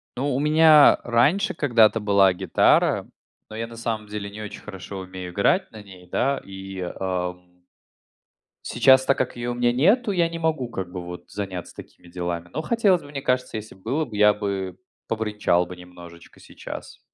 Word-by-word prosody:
Ну, 135 +3 -2
у - - 0
меня 155 0 +6
раньше 125 +12 +2
когда-то 115 -7 +3
была 100 -2 +4
гитара, 90 - +2 0.4
но 110 - -9
я 115 +1 -3
на 115 - -12
самом 110 -2 -3
деле 105 -1 -5
не 105 +2 -9
очень 105 - -8
хорошо 95 -1 -8
умею 95 -1 -8
играть 100 - +1
на 110 -1 -10
ней, 95 -3 -15
да, 135 +9 0
и, 95 -1 -8 0.2
ам 90 -1 -4 1.0
сейчас, 130 0 +5
так 135 - +2
как 130 - -2
ее 120 0 -4
у - - -1
меня 120 0 +1
нету, 205 - +3
я 170 -3 +1
не 165 0 -6
могу 155 -7 -1
как 95 -6 -5
бы 90 -1 -7
вот 90 0 -9
заняться 95 -4 -6
такими 90 - -13
делами, 85 -1 -4
но 155 - -2
хотелось 200 -3 +2
бы. 145 - -13
Мне 140 -1 -5
кажется, 125 -3 -1
если 110 -2 -9
бы 95 - -23
было, 140 +8 -1
я 105 0 +5
бы 95 -3 -4 0.3
побренчал 105 -5 0
бы 90 +1 -9
немножечко 90 -1 -14
сейчас. - - -10
105 Hz, 180 wpm, -23 LUFS, 95-130 Hz, 1.0 s, меня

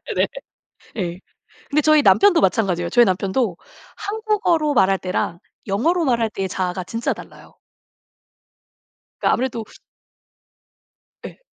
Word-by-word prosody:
네네. - - +2 0.7
예. 175 -3 -3 0.5
근데 300 +1 +3
저희 310 0 +5
남편도 390 0 +5
마찬가지예요. 180 - +1
저희 240 +4 +6
남편도 190 +1 0 0.4
한국어로 405 -8 0
말할 195 -3 +3
때랑 180 -2 -3 0.3
영어로 325 - +1
말할 235 -5 +1
때의 195 -2 -3
자아가 185 0 -3
진짜 230 +5 -2
달라요. - - -12 1.7
그니까 - - +3
아무래도 240 -2 -2 1.6
예. - - -12
230 Hz, 270 characters per minute, -21 LUFS, 190-305 Hz, 1.7 s, 저희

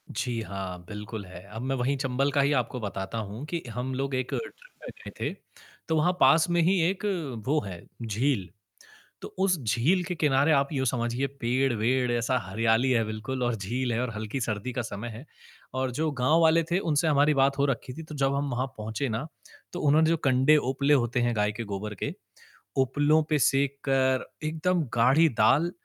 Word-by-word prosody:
जी 120 -3 -2
हाँ, 95 -3 -5
बिल्कुल 105 0 -7
है। 90 -1 -11
अब 110 +3 -7
मैं 135 +1 -1
वही 130 +2 0
चंबल 135 +1 0
का 140 - +2
ही 140 +1 +2
आपको 125 -1 -1
बताता 100 0 -4
हूँ 110 +5 -5
कि 170 +2 -3
हम 125 +3 -3
लोग 135 0 -2
एक 130 -1 -1
ट्रिप - - -6
में - - -8 0.2
गए - - -6
थे, - - -2 0.5
तो 160 - +1
वहाँ 160 +4 +3
पास 155 +6 +5
में 175 0 +2
ही 185 +3 +3
एक 195 +2 -4 0.4
वो 150 +3 +3
है 90 -3 -7 0.2
झील। 110 -3 0 0.7
तो - - -6
उस 190 -2 +3
झील 130 - +2
के 180 0 -4
किनारे 145 -1 +3
आप 140 -1 +2
यूँ 130 -2 0
समझिए 120 +2 0
पेड़-वेड 125 0 +1
ऐसा 120 +2 +1
हरियाली 115 +5 +1
है 115 -2 +3
बिल्कुल 110 +4 -4
और 120 -1 +1
झील 120 +5 -2
है 115 - 0
और 125 - -2
हल्की 110 +5 -4
सर्दी 110 +2 -2
का 125 - -1
समय 110 0 -6
है। 115 +5 -9 0.5
और 130 -1 -1
जो 155 +6 -1
गाँव 150 +6 +4
वाले 165 +1 +5
थे 175 - +3
उनसे 160 -3 +1
हमारी 150 0 +4
बात 140 0 +2
हो 140 - +3
रखी 130 -2 -2
थी, 160 - -8
तो 155 -1 -9
जब 135 -1 +1
हम 140 0 -1
वहाँ 125 +2 -1
पहुँचे 110 +5 -3
ना, 115 +7 -3 0.5
तो 175 - -4
उन्होंने 155 +2 +4
जो 165 - +2
कंडे 135 +1 +4
उपले 140 +1 +1
होते 120 -3 +2
हैं 120 -1 +1
गाय 105 -1 +1
के 105 +3 -5
गोबर 105 0 -5
के, - - -2 0.6
उपलों 145 +4 +3
पे 150 -1 +2
सेक 140 +1 +2
कर 130 -1 +2 0.2
एकदम 165 +2 0
गाढ़ी 130 +8 +5
दाल 145 +11 +4
130 Hz, 200 wpm, -27 LUFS, 115-145 Hz, 0.7 s, पास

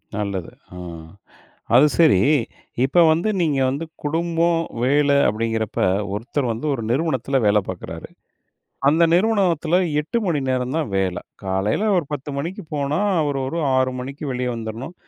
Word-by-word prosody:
நல்லது. 100 -4 -3 0.2
அ. - - -9 1.0
அது 130 +4 +7
சரி, 155 - +5 0.7
இப்போ 175 +6 +3
வந்து 170 +7 +1
நீங்க 150 -5 +1
வந்து 140 +5 -3 0.2
குடும்பம், 165 +2 +1 0.2
வேலை 140 +1 +3
அப்படீங்கிறப்ப, 110 0 -2 0.3
ஒருத்தர் 120 +4 -2
வந்து 115 +7 -5
1 120 - -3
நிறுவனத்தில 135 -1 0
வேலை 105 0 +4
பாக்குறாரு. 85 -3 -7 0.8
அந்த 160 +4 +3
நிறுவனத்துல 180 -5 +2 0.2
8 160 +10 -2
மணி 155 -5 +1
நேரம் 130 +1 -1
தான் 160 -5 -1
வேலை. 95 -2 0 0.2
காலையில 95 - 0
ஒரு 170 - +1
10 145 0 -4
மணிக்கு 180 +8 -4
போனா, 145 +3 -1 0.2
அவர் 145 -2 -1
ஒரு 165 +5 -3 0.2
6 130 0 +2
மணிக்கு 135 +4 -7
வெளிய 125 0 -2
வந்துரணும். 115 +8 -6
140 Hz, 140 wpm, -21 LUFS, 115-165 Hz, 1.0 s, அது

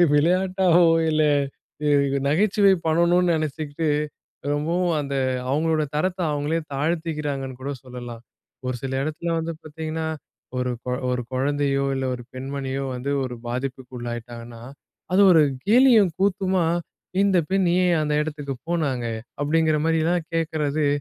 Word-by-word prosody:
விளையாட்டாவோ! 180 +2 +4 0.2
இல்ல 155 0 +3 1.1
நகைச்சுவை 200 +4 +4
பண்ணணும்னு 170 +2 +3
நினைச்சுகிட்டு 155 0 -2 0.6
ரொம்பவும் 170 +4 0
அந்த 140 -1 -4 0.4
அவுங்களோட 155 +2 +1
தரத்த 185 +4 -1
அவங்களே 150 +3 -1
தாழ்த்திக்கிறாங்கன்னு 150 -4 -2
கூட 140 +2 -3
சொல்லலாம். 120 -2 -8 0.4
ஒரு 125 -1 -1
சில 135 -1 -3
இடத்துல 155 +3 -3
வந்து 165 +1 -3
பார்த்தீங்கன்னா, 160 +1 -4 0.5
ஒரு 125 0 0
குழ 125 0 -1 0.2
ஒரு 125 0 -1
குழந்தையோ, 140 +1 +1
இல்ல 135 - -2
ஒரு 120 - -9
பெண்மணியோ 135 +1 -4
வந்து 125 +3 -3
ஒரு 125 -1 -4
பாதிப்புக்குள்ளாகிட்டாங்கன்னா, 120 -2 -6 0.5
அது 195 +2 +5
ஒரு 165 - +6 0.3
கேலியும் 230 -3 +6
கூத்துமா 190 -2 +1 0.6
"இந்த 195 -2 +3
பெண் 195 0 +2 0.2
ஏன் 175 -1 +3
அந்த 150 0 -1
இடத்துக்கு 145 -3 -4
போனாங்க" 140 -8 0 0.4
அப்டிங்கிற 155 +1 +2
மாரிலாம் 165 +1 +1
கேக்கறது 155 -2 0
155 Hz, 115 wpm, -24 LUFS, 135-170 Hz, 1.1 s, ஒரு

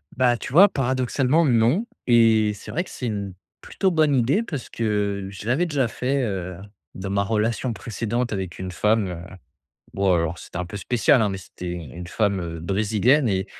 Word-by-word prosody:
Bah, 125 -1 +3
tu 125 - -7
vois, 180 +9 +8
paradoxalement, 130 +2 +1
non 125 - +3 0.2
et 110 -3 +4
c'est 100 - -10
vrai 170 - -1
que - - -14
c'est 125 - -6
une 100 -4 -3 0.3
plutôt 190 -1 -1
bonne 155 -4 +3
idée 130 - +2
parce 145 - -6
que 105 -3 -1
je 100 +1 -10
l'avais 135 +9 +2
déjà 140 -6 +1
fait, 130 +4 -1
heu, 90 -5 -3 0.4
dans 95 +1 -5
ma 100 0 +1
relation 110 +4 0
précédente 115 +2 -3
avec 95 -3 -4
une 95 0 -4
femme, 105 +3 +1
heu. 85 -1 -6 0.7
Bon 100 0 +1
alors, 85 0 -1
c'était - - -10
un 90 - -2
peu 95 +4 -7
spécial, 125 +6 +3
hein, 110 - +2
mais 95 - -3
c'était 90 -1 -10
u 90 - -3
une 85 +1 -8
femme, 100 +1 0
heu, 85 -1 -5
brésilienne 110 - +2
et 95 -1 0
110 Hz, 195 wpm, -23 LUFS, 95-130 Hz, 0.7 s, vois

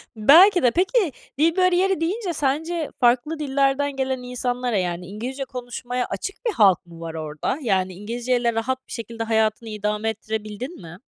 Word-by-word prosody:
Belki 335 - +7
de. 245 - +5
Peki 375 - +2 0.3
dil 325 +2 +3
bariyeri 365 -1 +3
deyince 365 +2 -1
sence 310 +3 -1
farklı 255 +6 +2
dillerden 275 0 +1
gelen 265 -1 -1
insanlara 250 -2 -2
yani 180 -1 -2
İngilizce 250 +8 -5
konuşmaya 245 0 -4
açık 295 - -5
bir 460 - +2
halk 195 - +4
mı 170 -1 -13
var 165 -1 -6
orada? 155 - -3
Yani 190 -6 0
İngilizceyle 235 +4 -1
rahat 255 +4 -2
bir - - -16
şekilde 230 -1 -5
hayatını 220 0 0
idame 210 +1 -1
ettirebildin 220 - -5
mi? 165 0 -10
245 Hz, 155 wpm, -23 LUFS, 215-285 Hz, 0.3 s, Belki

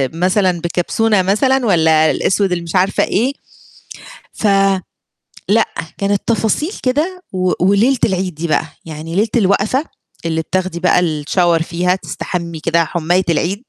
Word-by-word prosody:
مثلًا 185 0 +1
بكبسونة 190 +5 +1
مثلًا، 250 +8 +1
والّا 160 -5 +4
الأسود 195 0 0
اللي 175 -1 -1
مش 165 +1 -6
عارفة 185 +1 +2
إيه؟ 250 +7 0 1.0
ف 215 - -1 1.0
لأ، 220 +2 +4 0.3
كانت 200 0 0
تفاصيل 230 - 0
كده 320 +8 -1
و 185 -1 0
وليلة 215 +8 +3
العيد 185 -3 -2
دي 165 +3 -4
بقى، 155 - +1 0.2
يعني 160 +1 -7
ليلة 210 +4 +2
الوقفة 215 +5 +2 0.4
اللي 160 -1 0
بتاخدي 185 +1 -2
بقى 180 0 +3 0.2
الShower 170 +1 +2
فيها 180 +2 0
تستحمي 170 -3 -5
كده 165 +1 +1
حُماية 175 +3 0
العيد، 185 +6 -1
185 Hz, 135 wpm, -16 LUFS, 170-210 Hz, 1.0 s, والّا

